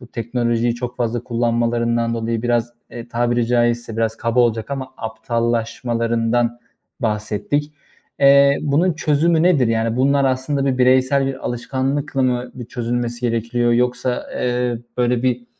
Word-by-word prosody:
bu 120 - -12
teknolojiyi 120 0 -1
çok 125 0 -6
fazla 120 -1 -1
kullanmalarından 115 0 0
dolayı 115 0 -2
biraz, 120 -1 0 0.2
eee, 120 0 -8
tabiri 120 0 0
caizse 120 -1 0
biraz 115 0 0
kaba 115 +2 +1
olacak 115 0 +1
ama 135 -1 -4
aptallaşmalarından 115 0 -1 0.4
bahsettik. 110 +6 -2 0.5
Eee, 140 0 +6
bunun 155 +5 +2
çözümü 160 +1 +2
nedir? 165 -8 +4
Yani 115 0 0
bunlar 140 +2 +3
aslında 135 +2 0
bir 130 -2 0
bireysel 130 +2 +3
bir 135 -1 -5
alışkanlıkla 135 +3 -2
mı 125 -1 0
bir 125 - -7
çözülmesi 120 0 -3
gerekiyor 120 0 0
yoksa, 125 +1 0
eee, 125 -1 -1 0.2
böyle 125 -1 +1
bir, 125 -1 0
120 Hz, 135 wpm, -20 LUFS, 115-130 Hz, 0.5 s, Eee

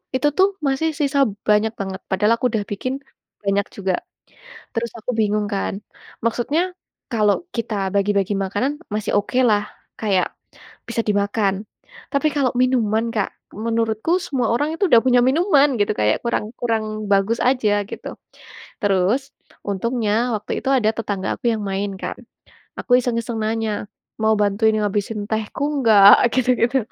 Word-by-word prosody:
itu 275 +3 +2
tuh 380 +1 +6 0.2
masih 275 +4 +1
sisa 280 -1 +1 0.3
banyak 210 +1 +3
banget, 190 -1 -4
padahal 210 +4 +3
aku 250 - -3
udah 215 -2 -1
bikin 255 +6 -2 0.5
banyak 200 0 +1
juga. 190 -2 -1 0.8
Terus 230 0 -2
aku 225 - -4
bingung 210 -1 +1
kan. 195 - -2 0.5
Maksudnya 240 +7 +1 0.5
kalo 210 -3 +3 0.2
kita 230 -2 -3 0.2
bagi-bagi 200 0 +1
makanan, 205 +9 -1 0.2
masih 215 0 -2
okelah, 215 -1 +2 0.4
kayak 195 -4 +1 0.6
bisa 235 - -5
dimakan. 205 -1 +1 0.6
Tapi 280 +2 +2
kalo 275 -3 +2
minuman, 230 -4 +2
Kak, 210 -3 0 0.2
menurutku 225 - -1 0.2
semua 255 -5 0
orang 290 +5 +1
itu 395 - 0
dah 235 - +9
punya 250 -1 +5
minuman 295 0 +4
gitu, 205 - +2
kayak 105 0 +2
kurang 235 - 0
kurang 225 -2 0 0.3
bagus 200 +4 +2
aja 250 -5 +2 0.2
gitu. - - -7 0.7
Terus, 200 +4 +2 0.5
untungnya 215 +2 -1 0.2
waktu 210 - -6
itu - - -15
ada 220 -4 +2
tetangga 200 -4 -3
aku - - -5
yang 215 - -4
main 200 +1 -2
kan. - - -4 0.6
Aku - - -4
iseng-iseng 235 -2 -2
nanya, 220 -1 -1 0.4
"Mau 220 - +4
bantuin 210 +2 +2
ngabisin 205 0 -2
tehku 220 +4 -3 0.2
nggak?" 205 -2 +9 0.2
Gitu 255 -1 +2
gitu. 240 +3 +2
220 Hz, 145 wpm, -21 LUFS, 205-245 Hz, 0.8 s, dah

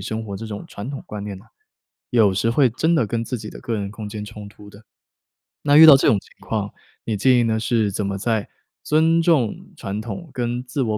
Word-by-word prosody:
生 110 0 -4
活 100 -2 -6
这 115 - -7
种 105 -2 -7
传 105 +7 -7
统 140 - -6
观 105 -1 -6
念 100 -2 -6
呢， 95 - -18 0.7
有 110 -6 +4
时 115 +4 +1
会 130 +2 +4
真 160 +8 +1
的 115 - +2
跟 115 +1 -2
自 125 - -4
己 105 - -8
的 - - -10
个 115 - -3
人 100 -2 -3
空 105 0 -7
间 105 0 -6
冲 105 -1 -10
突 105 0 -15
的。 100 +1 -15 0.8
那 145 0 +3
遇 160 - +11
到 155 -3 +10
这 - - +1
种 110 - +4
情 - - -22 0.2
况， 105 -2 -2 0.3
你 110 - -2
建 125 +4 +4
议 120 - +3
呢 110 -1 0
是 110 -2 0
怎 100 +1 -2
么 100 0 -3
在 110 0 -1 0.4
尊 160 +2 +3
重 150 -10 +1
传 100 +2 -5
统 110 - -7
跟 120 0 -2
自 130 +2 -3
我 110 -3 0
110 Hz, 255 characters per minute, -21 LUFS, 105-125 Hz, 0.8 s, 遇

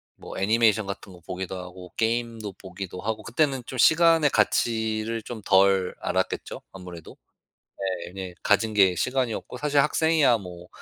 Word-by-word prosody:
뭐 - - -10
애니메이션 110 +1 +3
같은 100 0 -7
거 90 - -14
보기도 95 +1 -5
하고 90 0 -10
게임도 115 -2 -1
보기도 95 0 -8
하고 110 0 -3
그때는 135 +2 0
좀 130 - -7
시간의 165 +3 +5
가치를 110 0 0
좀 115 -1 -7
덜 95 -1 +3
알았겠죠? - - -2
아무래도? 90 -4 -11 0.9
네네 90 0 -8
가진 110 +2 +2
게 95 -3 +5
시간이었고 125 +1 -2
사실 145 +2 +1
학생이야 150 -3 +3
뭐 90 -3 -10
110 Hz, 325 characters per minute, -25 LUFS, 95-120 Hz, 0.9 s, 시간의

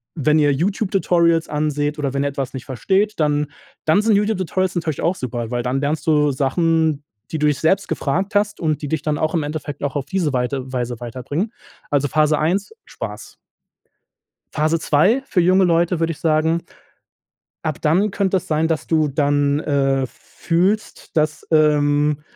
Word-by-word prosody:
wenn 155 0 +2
ihr 145 -1 +4
YouTube-Tutorials 175 -1 +1
anseht 150 0 -1
oder 140 -2 -2
wenn 140 - +1
ihr 140 - 0
etwas 135 -2 -4
nicht 130 - -7
versteht, 195 - 0
dann 150 -1 +2 0.4
dann 160 +6 +4
sind 220 -1 +3
YouTube-Tutorials 190 -3 0
natürlich 160 -4 -2
auch 170 +3 +1
super, 120 -5 -4
weil 120 -1 -1
dann 130 +2 -1
lernst 150 +2 -2
du 150 -2 +3
Sachen, 155 +2 +1 0.3
die 160 - -2
du 150 - +1
dich 145 -2 +1
selbst 190 +6 +2
gefragt 190 +9 -1
hast 205 0 +1
und 155 -3 -1
die 145 - -4
dich 155 -1 -2
dann 150 -1 0
auch 155 +2 0
im 160 - +1
Endeffekt 145 -1 -5
auch 140 -1 -2
auf 140 - -2
diese 170 -5 -1
Weite 130 +1 -2
Weise 120 -1 -3
weiterbringen. 130 - -4 0.4
Also, 145 0 +2
Phase 155 -1 +2
1, 190 - 0
Spaß. - - -8 1.2
Phase 155 +2 +1
2 190 - +3
für 180 - +2
junge 185 +2 +4
Leute 170 0 +2
würde 165 0 +1
ich 155 - -8
sagen, 160 +1 +1 1.0
ab 155 -2 -3
dann 185 +7 +2
könnte 195 -1 +1
es - - -6
sein, 155 +1 +1
dass 160 -2 -2
du 155 -2 +2
dann, 145 0 +1
äh, 135 -3 +1
fühlst, 185 - -2
dass, 155 0 0
ähm, 150 -1 +3
155 Hz, 175 wpm, -20 LUFS, 145-170 Hz, 1.2 s, ihr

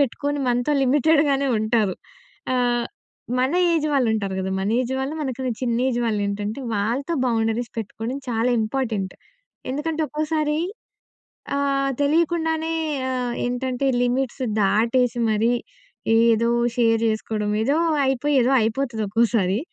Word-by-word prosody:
పెట్టుకొని 285 +2 0
మనతో 245 +4 +1
లిమిటెడ్‍గానే 280 0 +3
ఉంటారు. 215 -3 +1 0.6
ఆహ్, 245 -1 +1 0.5
మన 260 +1 +2 0.2
ఏజ్ 315 -2 +1
వాళ్ళు 260 -5 +2
ఉంటారు 200 -3 -2
కదా! 190 0 -3
మన 195 - -1
ఏజ్ 255 +1 -2
వాళ్ళు, 270 +3 -3
మనకన్నా 260 -1 -3
చిన్న 235 -2 0
ఏజ్ 240 -2 -1
వాళ్ళు 210 -2 0
ఏంటంటే, 205 +5 -3
వాళ్ళతో 240 +11 -1
బౌండరీస్ 225 0 0
పెట్టుకోవడం 225 +4 -4
చాలా 235 +1 +1
ఇంపార్టెంట్. 215 -5 -2 0.6
ఎందుకంటే 315 +3 -2
ఒక్కోసారి 305 0 -1 1.0
ఆహ్, 275 -1 +1
తెలియకుండానే 320 +1 +1 0.4
ఆహ్, 250 -2 -2
ఏంటంటే 255 +2 -2 0.2
లిమిట్స్ 255 +1 -1 0.2
దాటేసి 235 +4 +2
మరి 220 +3 +2 0.7
ఏదో 230 0 +3 0.3
షేర్ 225 -2 +3
జేసుకోవడం, 215 -1 -2
ఏదో 280 +6 +2 0.3
అయిపోయి, 270 +2 0
ఏదో 255 - +2
అయిపోతది 225 0 -1
ఒక్కోసారి. 215 -3 +2
245 Hz, 120 wpm, -23 LUFS, 225-275 Hz, 1.0 s, లిమిటెడ్‍గానే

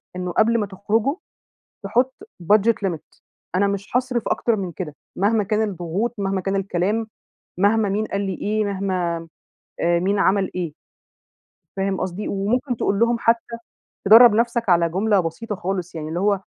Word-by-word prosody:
إنه 180 0 -3
قبل 230 +5 +3
ما 210 - 0
تخرجوا 210 +8 0 0.7
تحط 245 +6 +1 0.3
budget 210 +5 +4
limit، 165 -4 -7 0.3
أنا 200 +2 +3
مش 200 +1 -3
هاصرف 250 -2 0
أكتر 235 - +1
من 190 -4 -4
كده، 155 -3 -6 0.2
مهما 210 +2 +2
كان 210 +2 0
الضغوط، 185 +5 -2
مهما 195 -1 -1
كان 195 +2 -1
الكلام، 195 +3 -1 0.5
مهما 205 +1 +3
مين 210 +2 0
قال 200 -2 -3
لي 195 -1 -2
إيه، 215 +1 0
مهما 185 -4 -2 0.5
آآ 170 0 +2
مين 195 +3 0
عمل 195 0 +2
إيه. 175 -4 -3 1.0
فاهم 195 0 -1
قصدي؟ 185 +2 -3
وممكن 240 +6 -1
تقول 200 -2 0
لهم 235 +1 +3
حتى 230 0 +1 0.5
تدرب 225 +2 +8
نفسك 235 -1 0
على 170 -1 +4
جملة 200 +4 +2
بسيطة 180 +6 -3
خالص، 180 -1 -4
يعني 155 -1 -5
اللي 165 +2 -3
هو 200 0 +1
200 Hz, 160 wpm, -22 LUFS, 185-220 Hz, 1.0 s, تدرب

